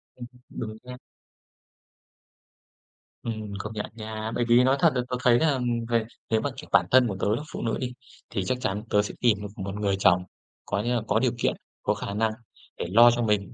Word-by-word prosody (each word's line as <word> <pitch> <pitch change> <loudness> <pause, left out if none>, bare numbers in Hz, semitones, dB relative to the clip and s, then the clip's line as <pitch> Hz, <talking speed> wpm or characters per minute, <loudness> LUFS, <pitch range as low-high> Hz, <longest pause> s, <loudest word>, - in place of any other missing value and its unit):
Ừm, 120 -1 -8 0.2
đúng 110 -1 -6
nha. 125 0 -9 2.3
Ừm, 110 -3 -4
công 110 +2 -5
nhận 105 - -3
nha. 110 0 -5
Bởi 120 - +1
vì 120 +2 +6
nói 130 +1 +4
thật 165 - +6
là 125 - +2
tớ 125 - -1
thấy 120 -2 +5
là, 160 -2 +3
ừm, 130 -2 -2 0.3
người 115 -2 +2 0.2
nếu 110 -1 +2
mà 145 - -1
kiểu 150 - -9
bản 90 -3 +5
thân 130 -1 +6
của 100 - -3
tớ 105 +2 +1
là 145 - -3
phụ - - -4
nữ 115 - -1
đi, 125 -1 -3 0.4
thì 100 -5 -2
chắc 130 - 0
chắn 105 +3 -2
tớ 105 - +4
sẽ 105 - -5
tìm 115 -4 +4
một 105 - -4
một 100 +1 -4
người 100 -2 0
chồng, 90 -1 +4 0.4
có 100 0 -1
nghĩa 120 +2 0
là 115 - +1
có 110 +2 +3
điều 125 -1 +2
kiện, - - +2 0.3
có - - +2
khả 100 - -5
năng 110 +1 +1 0.5
để - - -3
lo 120 +3 +8
cho 120 0 -1
mình, 105 -4 0
110 Hz, 225 wpm, -26 LUFS, 105-120 Hz, 2.3 s, lo